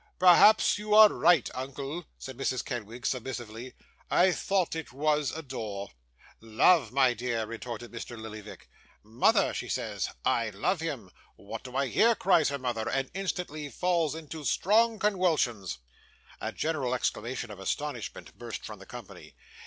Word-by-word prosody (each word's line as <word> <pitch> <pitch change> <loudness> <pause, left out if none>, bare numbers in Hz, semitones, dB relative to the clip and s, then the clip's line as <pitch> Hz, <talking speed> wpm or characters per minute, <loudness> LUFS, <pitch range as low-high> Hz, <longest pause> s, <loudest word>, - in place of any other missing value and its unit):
'Perhaps 205 +4 +6
you 210 0 +1
are 215 0 +10
right, 170 - +3
uncle,' 140 +5 -5 0.2
replied 130 - -8
Mrs. 130 -2 -1
Kenwigs, 120 -2 -4
submissively. 120 -1 -6 0.3
'I 185 +1 +4
thought 185 -2 0
it 160 -1 -6
was 150 +2 +1
"adore."' 110 -10 -6 0.5
'"Love," 115 +4 +3
my 130 -1 +4
dear,' 120 -1 -2
retorted 115 +1 -7
Mr. 120 0 -7
Lillyvick. 110 -1 -9 0.4
'"Mother," 110 +3 +2
she - - -5
says, - - -2 0.2
"I 115 -2 +2
love 105 - -1
him!" 140 - -5 0.2
"What - - -8
do 125 0 -10
I 140 +1 +2
hear?" 230 - +3
cries 175 -7 +3
her 140 - -2
mother; 120 -4 -2
and 135 0 -1
instantly 180 -6 -4
falls 170 -2 0
into 160 -1 -8
strong 220 +9 +3
conwulsions.' 155 - 0 0.6
A - - -3
general 145 -6 -1
exclamation 125 -1 -3
of 100 - -10
astonishment 125 +5 -4
burst - - -6
from - - -8
the - - -13
company. - - -11
135 Hz, 145 wpm, -29 LUFS, 115-165 Hz, 0.6 s, are